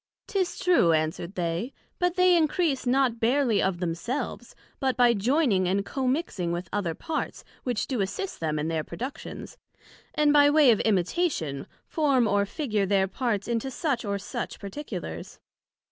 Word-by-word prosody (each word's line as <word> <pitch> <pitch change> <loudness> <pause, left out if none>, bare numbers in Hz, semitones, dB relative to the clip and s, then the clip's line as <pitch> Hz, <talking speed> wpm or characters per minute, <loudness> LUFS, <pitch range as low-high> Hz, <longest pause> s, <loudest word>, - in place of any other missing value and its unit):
'Tis 380 -3 -1
true, 335 - +4
answer'd 160 +4 -1
they: 175 +7 -2 0.3
but 355 0 +1
they 365 -1 +5
increase 315 -4 +1
not 250 -2 +2
barely 235 -2 +2
of 190 -2 0
themselves, 235 - -4 0.2
but 260 -2 0
by 245 -1 +5
joining 230 - +2
and 195 +2 0
commixing 255 - -1
with 175 +1 -3
other 185 -6 -1
parts, 320 - -4 0.2
which 245 -4 -1
do 250 -6 -2
assist 375 - -3
them 155 -2 -1
in 150 +1 -1
their 160 -1 -1
productions, 260 - -7 0.6
and 300 -1 +4
by 290 -1 +7
way 290 -4 +6
of 220 - +2
imitation 185 - 0 0.2
form 275 -7 +2
or 200 -1 +2
figure 215 -5 -1
their 195 0 +3
own 190 - -2
parts 210 -1 -2
into 235 +2 -1
such 265 -2 -1
or 200 -2 -1
such 200 - -5
particulars. 250 +9 -7
235 Hz, 160 wpm, -27 LUFS, 190-285 Hz, 0.6 s, by